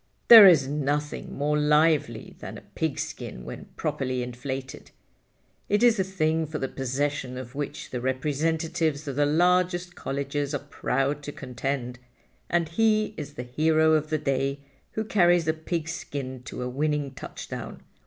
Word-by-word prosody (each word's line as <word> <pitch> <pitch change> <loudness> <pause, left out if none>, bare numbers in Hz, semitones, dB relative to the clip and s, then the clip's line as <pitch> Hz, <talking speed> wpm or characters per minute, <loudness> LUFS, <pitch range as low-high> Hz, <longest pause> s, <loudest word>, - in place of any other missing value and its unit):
There 225 -4 +12
is 155 -7 +6
nothing 145 +1 -2
more 150 +1 +1
lively 150 -5 +2
than - - -7
a - - -11
pigskin 145 - -4
when - - -8
properly 130 -1 -2
inflated. 130 +2 -6 0.8
It 205 +3 +2
is 235 -3 +5
a - - +3
thing 160 -4 0
for 155 +1 -4
the 135 - -2
possession 130 0 -2
of 130 -1 -8
which 145 0 -5
the 125 - -3
representatives 155 +3 -1
of 140 - -3
the 145 +1 +2
largest 180 +2 +2
colleges 140 0 -3
are 145 - -5
proud 140 +2 -1
to 145 - -6
contend, 125 -1 -4 0.5
and 170 -1 +1
he 215 +3 +2
is - - -7
the 125 - -5
hero 155 +5 +2
of 155 -1 +1
the 155 - +1
day 140 -1 -1 0.3
who 220 - -1
carries 175 -5 +3
the 160 - +2
pigskin 155 -5 -4
to 125 - -5
a - - -2
winning 145 +2 -1
touchdown. - - -8
150 Hz, 155 wpm, -26 LUFS, 135-160 Hz, 0.8 s, There